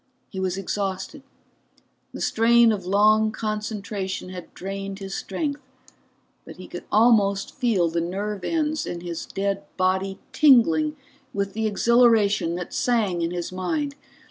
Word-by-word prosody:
He 190 - -5
was 190 0 -1
exhausted, 195 +7 -3 0.9
the - - -8
strain 230 +1 +4
of 190 -4 -3
long 215 +2 +4
concentration 210 -3 -4
had 180 -2 -9
drained 195 +1 -5
his 195 -1 -7
strength, 285 - -3 0.8
but - - -11
he - - -11
could - - -8
almost 205 -3 +3
feel 230 - +1
the 165 +1 -1
nerve 195 +3 -3
ends 310 - -1
in 170 - -5
his 170 -2 -5
dead 195 0 -2 0.2
body 190 +1 0 0.2
tingling 165 - +5 0.4
with 200 -1 -2
the 220 0 -1
exhilaration 215 -5 +3
that 180 0 -6
sang 215 -8 +1
in 165 - 0
his 175 0 -4
mind. 280 - -2
200 Hz, 140 wpm, -24 LUFS, 185-225 Hz, 0.9 s, tingling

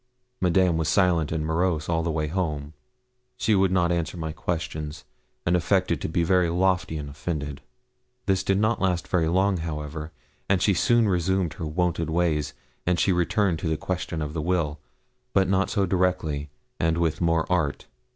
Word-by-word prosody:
Madame 90 -1 +3
was 80 -1 0
silent 85 -5 +2
and 80 -1 -1
morose 80 -1 0
all 80 -1 +1
the 85 - -1
way 80 -1 0
home. 75 -3 -2 0.6
She 110 - +2
would 95 -2 +3
not 90 -2 +2
answer 85 0 -1
my 80 -1 -3
questions, 80 -2 -4 0.4
and 85 - +3
affected 90 -3 +1
to - - -2
be 85 +1 +1
very 90 0 +3
lofty 90 -2 +1
and 75 -1 -5
offended. 75 -1 -4 0.6
This 95 -1 +2
did 95 0 +1
not 110 +3 +1
last 90 -3 0
very 85 -3 +1
long, 95 +3 +2
however, 75 -1 -5 0.4
and 95 -2 +3
she 100 - +3
soon 120 +5 +3
resumed 90 -2 +1
her 80 - -5
wonted 85 0 0
ways. 80 -3 0 0.3
And 90 -1 +1
she 95 - +3
returned 90 0 +1
to - - -3
the 80 - 0
question 85 -3 -3
of 75 0 -5
the 80 - -2
will, 80 -3 0 0.5
but 95 -1 +3
not 95 +1 +2
so 100 -2 +1
directly, 90 -6 0 0.3
and 80 0 +1
with 85 -1 0
more 85 -1 +2
art. 85 -6 0
85 Hz, 180 wpm, -25 LUFS, 80-95 Hz, 0.6 s, Madame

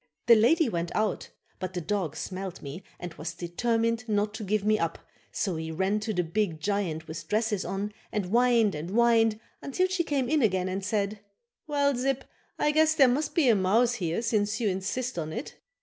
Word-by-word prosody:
The 235 - +8
lady 270 +8 +4
went 170 -5 -2
out 215 -2 -1 0.3
but 185 0 -5
the - - 0
dog 175 -3 -2
smelled 190 0 -5
me 145 +6 -7 0.2
and 175 -2 -6
was 165 +2 -6
determined 230 +6 -1
not 210 0 +1
to 220 0 -6
give 210 +1 0
me 215 0 +3
up 165 0 -1 0.3
so 185 -6 -1
he 160 0 -4
ran 190 +5 0
to 215 +1 -3
the 180 -4 0
big 170 -1 -1
giant 170 -4 -2
with 160 0 -7
dresses 215 -1 0
on 195 +3 -3 0.2
and 210 -3 -1
whined 230 0 +3
and 155 +3 -5
whined 225 0 +3 0.2
until 365 +7 0
she 370 -2 0
came 280 -5 0
in 305 +2 +2
again 185 -5 +1
and 190 +1 -3
said: 205 0 -1 0.5
"Well, 285 -2 +2
Zip, 265 +2 -1 0.3
I 300 - +2
guess 315 +1 +4
there 275 -4 +6
must 285 +5 0
be 320 -6 +4
a 235 - +7
mouse 220 +6 +3
here 180 -1 -2
since 210 -2 0
you 220 -4 +1
insist 195 +5 -2
on 155 -1 -4
it." 235 - -6
210 Hz, 200 wpm, -28 LUFS, 185-240 Hz, 0.5 s, The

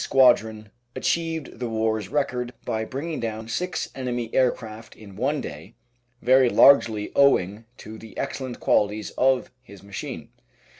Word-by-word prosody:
43 - - -2
Squadron 110 -5 +3 0.2
achieved 165 -7 -2
the 120 -2 -3
war's 110 -2 -1
record 125 -3 -1
by 110 0 -1
bringing 145 +7 -5
down 110 -1 -4
six 170 +7 -2
enemy 120 -3 -4
aircraft 115 -3 -1
in 100 -3 -13
one 140 +7 -1
day, 75 +2 -9 0.5
very 130 0 +5
largely 115 -6 +5
owing 110 -6 +3
to 110 +1 -10
the 110 -1 -13
excellent 130 -3 -4
qualities 105 0 +1
of 130 0 +1
his 100 -7 -15
machine. 100 0 -7
115 Hz, 140 wpm, -24 LUFS, 110-130 Hz, 0.5 s, very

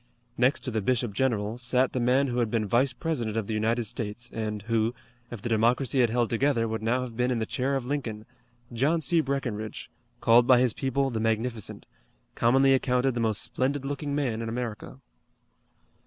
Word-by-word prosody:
Next 130 +4 +2
to 130 - -4
the 110 -1 -1
bishop 120 0 0
general 110 -1 -1
sat 125 +1 +1
the 130 - -1
man 125 +3 +3
who 125 -2 -1
had 115 -2 +1
been 110 -1 0
Vice 120 +6 +2
President 120 -6 -3
of 110 - -1
the 110 - -4
United 115 +3 +1
States 115 +2 -5
and 105 -2 -3
who, 115 +1 0 0.3
if 120 -4 -8
the 120 - -2
Democracy 120 +4 +2
had 120 - +3
held 120 +1 +1
together 120 -1 +1
would 110 0 -3
now 120 +3 +1
have 125 -3 -6
been 125 +1 +1
in 125 - 0
the 110 - -1
chair 130 +5 -1
of 135 -2 -2
Lincoln, 125 -6 -4 0.5
John 145 +8 +1
C. 165 +2 +3
Breckinridge, 120 -7 -4 0.3
called 120 +1 +5
by 130 - +7
his 125 -2 +2
people 135 0 -1
the 115 - -2
Magnificent, 115 0 -2 0.5
commonly 135 +3 +4
accounted 130 0 +1
the 120 - -2
most 110 -2 +1
splendid 135 +1 -1
looking 145 +1 -3
man 125 -6 -1
in 115 - -3
America. 120 0 -5
120 Hz, 195 wpm, -27 LUFS, 110-130 Hz, 0.5 s, by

